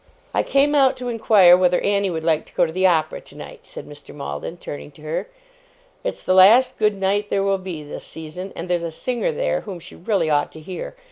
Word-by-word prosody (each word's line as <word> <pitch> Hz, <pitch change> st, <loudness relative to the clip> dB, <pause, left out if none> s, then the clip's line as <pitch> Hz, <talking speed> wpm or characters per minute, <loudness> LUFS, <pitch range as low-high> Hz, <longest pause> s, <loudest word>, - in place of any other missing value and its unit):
'I -, -, +2 dB
came 280 Hz, +2 st, +3 dB
out 270 Hz, -3 st, +4 dB
to 250 Hz, -1 st, -5 dB
inquire 210 Hz, -6 st, +6 dB
whether 180 Hz, -1 st, +2 dB
Annie 200 Hz, -1 st, +1 dB
would 160 Hz, -2 st, -4 dB
like 160 Hz, -2 st, 0 dB
to -, -, -20 dB
go -, -, +3 dB
to -, -, -5 dB
the 185 Hz, +3 st, +2 dB
opera 160 Hz, -3 st, 0 dB
tonight,' -, -, -12 dB
said -, -, -9 dB
Mr. -, -, -13 dB
Maldon, 70 Hz, -, -6 dB
turning 145 Hz, -3 st, -8 dB
to 155 Hz, -, -17 dB
her. 155 Hz, -, -3 dB, 0.8 s
'It's -, -, -4 dB
the 185 Hz, -, +1 dB
last 235 Hz, +8 st, +6 dB
good 210 Hz, -1 st, +2 dB
night 200 Hz, +2 st, -1 dB
there 195 Hz, -, 0 dB
will 195 Hz, -1 st, +1 dB
be, 180 Hz, -5 st, -7 dB
this 145 Hz, -, -7 dB
season; 160 Hz, +4 st, -7 dB
and 170 Hz, -, -6 dB
there's 175 Hz, -1 st, 0 dB
a 170 Hz, -, -3 dB
singer 245 Hz, -, -2 dB
there, -, -, -1 dB
whom 190 Hz, -4 st, -8 dB
she -, -, -12 dB
really 190 Hz, -2 st, -1 dB
ought 145 Hz, -1 st, +1 dB
to 160 Hz, -, -10 dB
hear. 180 Hz, -, -7 dB
185 Hz, 225 wpm, -21 LUFS, 160-215 Hz, 0.8 s, inquire